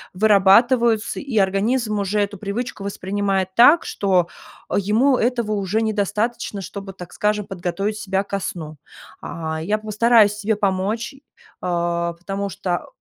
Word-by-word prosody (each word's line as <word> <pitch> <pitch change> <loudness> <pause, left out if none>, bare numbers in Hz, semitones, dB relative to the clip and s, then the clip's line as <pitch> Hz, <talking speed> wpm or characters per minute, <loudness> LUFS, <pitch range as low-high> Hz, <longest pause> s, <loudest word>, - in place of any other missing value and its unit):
вырабатываются, 220 +3 +4
и 265 -6 -4
организм 210 +3 +1
уже 200 +1 -1
эту 205 -1 -2
привычку 210 +1 -4
воспринимает 195 -1 -1
так, 290 +8 +6
что 185 -4 +1 0.5
ему 225 +7 +3
этого 235 -2 0
уже 210 +2 0
недостаточно, 210 0 -2
чтобы, 195 0 -8
так 180 -2 -11
скажем, 210 -1 0
подготовить 195 +3 -3
себя 195 -1 -1
ко 200 0 -3
сну. 155 -4 -6 0.4
А, 160 -1 -5
я 205 +6 0
постараюсь 215 0 +3
тебе 210 +1 -1
помочь, 205 +5 -1 0.5
а, 170 -1 -1
потому 195 +4 -4
что 180 -1 -3
200 Hz, 130 wpm, -21 LUFS, 190-220 Hz, 0.5 s, так